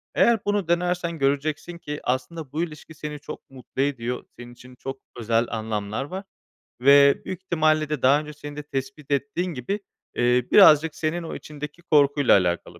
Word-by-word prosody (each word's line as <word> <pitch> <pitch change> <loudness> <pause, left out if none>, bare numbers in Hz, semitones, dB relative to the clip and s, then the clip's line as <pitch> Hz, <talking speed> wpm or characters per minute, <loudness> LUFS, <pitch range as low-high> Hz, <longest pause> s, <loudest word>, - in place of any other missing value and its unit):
Eğer 235 -1 +4
bunu 205 -3 0
denersen 175 0 0
göreceksin 145 +5 -1
ki 150 -3 -6
aslında 130 +3 -3
bu 160 +3 -1
ilişki 160 -1 -8
seni 150 -1 -7
çok 140 - -10
mutlu 130 0 -6
ediyor. 125 -3 -2 0.2
Senin 120 0 -10
için 125 +1 -15
çok 135 +1 -7 0.2
özel 115 0 +1
anlamlar 110 0 -3
var 185 +8 -6 0.6
ve 140 +1 +6
büyük 185 -1 -5
ihtimalle 155 -3 +1
de 150 -4 -2
daha 135 +3 +5
önce 150 0 -8
seni 145 0 -9
de 150 - -6
tespit 135 +1 -6
ettiğin 145 +6 -1
gibi, 155 - -3 0.4
eee, 125 0 +2
birazcık 160 -5 +7
senin 165 +2 -2
o 165 - -6
içindeki 150 +2 -8
korkuyla 145 -4 +4
alakalı 85 -2 -2
145 Hz, 170 wpm, -24 LUFS, 130-160 Hz, 0.6 s, birazcık